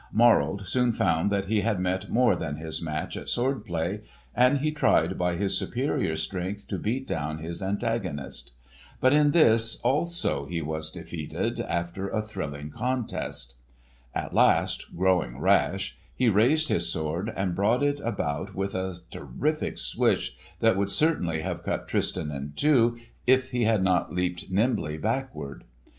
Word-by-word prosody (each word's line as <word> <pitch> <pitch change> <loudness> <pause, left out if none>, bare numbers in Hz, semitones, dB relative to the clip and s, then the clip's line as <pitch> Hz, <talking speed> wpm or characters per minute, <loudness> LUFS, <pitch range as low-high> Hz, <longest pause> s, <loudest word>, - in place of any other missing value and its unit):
Morold 100 -5 +4
soon 125 +5 +2
found 85 -4 +1
that 100 -1 0
he 105 +1 +1
had 110 -4 0
met 95 +2 -1
more 120 -4 +4
than 80 -4 -3
his 80 +1 -2
match 80 -2 -3
at - - -6
sword 130 -1 0
play, 85 +1 -2 0.3
and 125 +3 +4
he 155 +3 0
tried 155 - +2
by 90 -1 0
his 95 +2 +1
superior 130 - 0
strength 95 +5 -4
to - - -3
beat 130 +5 -2
down 75 0 -2
his 85 +4 -5
antagonist. 95 - -3 0.5
But 130 +2 +4
in 150 0 +5
this 115 -8 +4
also 145 - 0
he 85 0 -2
was 80 0 -1
defeated, 80 -2 -4
after 85 +3 -2
a 110 - -1
thrilling 75 -9 -6
contest. 75 - -3 0.6
At - - -3
last - - +3
growing 90 -10 +2
rash 95 +3 +2 0.2
he 125 -2 +3
raised 130 +10 +3
his 85 0 +1
sword 80 +7 -2
and 95 -2 -1
brought 110 +8 +2
it 145 0 +1
about 95 - -3
with 95 0 -2
a 95 -1 -2 0.2
terrific 155 +1 -2
swish - - 0 0.3
that 115 -4 +4
would 100 0 +1
certainly 90 - +1
have 90 -1 -3
cut - - -3
Tristan 75 -1 -1
in 70 0 -6
two, 120 -6 +3 0.3
if 130 0 +4
he 120 -2 +1
had 110 -3 +3
not 95 -1 +2
leaped 90 0 -2
nimbly 95 -6 0
backward. 115 - -3
95 Hz, 155 wpm, -27 LUFS, 85-120 Hz, 0.6 s, in